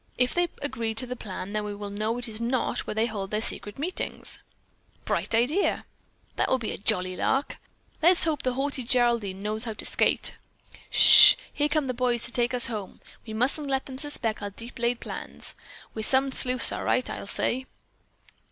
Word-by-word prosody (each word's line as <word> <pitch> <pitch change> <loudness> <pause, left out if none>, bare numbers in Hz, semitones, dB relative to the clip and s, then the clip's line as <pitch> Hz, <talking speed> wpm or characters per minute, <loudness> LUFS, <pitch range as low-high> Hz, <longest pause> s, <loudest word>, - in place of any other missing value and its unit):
If 250 0 +1
they 350 0 +2 0.2
agree 230 -6 -3
to 225 - +1
the 250 0 -5
plan, 200 -3 -7
then 210 0 -1
we 205 -1 -5
will 205 0 -7
know 215 +3 -2
that 245 +1 -2
is 220 0 -3
not 240 +2 -1
where - - -4
they 220 +1 +2
hold 205 -4 -4
their 210 - -1
secret 205 -2 -1
meetings." 335 +7 -4 0.7
"Bright - - 0
idea!" 275 - +1 0.5
"That - - +1
will 260 - +3
be 235 -4 -4
a - - -5
jolly 185 -2 +1
lark!" 270 +9 -1 0.4
"Hope 330 -3 +4
the 255 - -1
haughty 270 +1 -1
Geraldine 235 -6 +1
knows 215 +2 -3
how 225 - -4
to 210 - -8
skate." - - +2 0.6
"Ssh! - - +9 0.2
Here 295 0 0
come 310 -2 0
the 255 - -2
boys 245 -1 0
to 245 - +2
take 240 0 0
us 250 - +2
home. 215 -5 -6 0.3
We 220 - -6
mustn't 275 +6 0
let 270 -1 -1
them 260 -1 -7
suspect 260 -8 -2
our 205 - -4
deep 230 +5 -11
laid 235 0 0
plans. - - -5 0.4
We're 220 - -5
some 265 +4 +2
sleuths 255 -2 +1
all - - -4
right, 255 - +2
I'll - - -6
say." 260 +5 -2
240 Hz, 195 wpm, -26 LUFS, 215-260 Hz, 0.7 s, Ssh